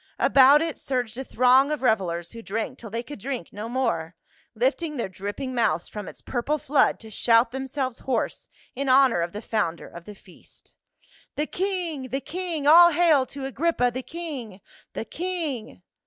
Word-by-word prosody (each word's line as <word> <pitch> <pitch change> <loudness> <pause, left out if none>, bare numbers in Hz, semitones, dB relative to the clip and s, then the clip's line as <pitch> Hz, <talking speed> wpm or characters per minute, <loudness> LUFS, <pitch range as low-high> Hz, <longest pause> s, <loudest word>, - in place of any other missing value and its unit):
About 280 +3 +6
it 330 -2 -4
surged 250 -4 -2
a - - -3
throng 260 +3 +4
of 300 -3 -3
revelers 175 -7 0
who 230 - -9
drank 220 +1 -4
till 225 - -9
they 230 +3 -4
could 290 -1 -9
drink 255 -5 -5
no 210 +3 -6
more, 180 -10 -1 0.4
lifting 290 +6 0
their 235 - -2
dripping 205 +8 -5
mouths 175 -9 0
from 210 -2 -7
its - - -10
purple 265 +4 -1
flood 285 0 +2
to 220 -1 -12
shout 230 +2 +3
themselver 265 -1 -4
hoarse 255 -4 -2 0.3
in 275 +1 -2
honor 255 -8 +5
of 170 0 -2
the 210 +4 -7
founder 205 -8 -2
of 170 0 -12
the 210 - -10
feast. 190 -2 -20 0.3
" - - -30
The 300 - 0
king! 350 -7 -3
The 265 +3 -2
king! 335 -1 -4
All 345 +3 +8
hail 300 -5 +4
to 275 -1 -7
Agrippa, 270 -1 +1
the 255 - -3
king 270 - -7 0.2
— - - -30
the - - -4
king 285 - -4
255 Hz, 185 wpm, -25 LUFS, 220-290 Hz, 0.4 s, All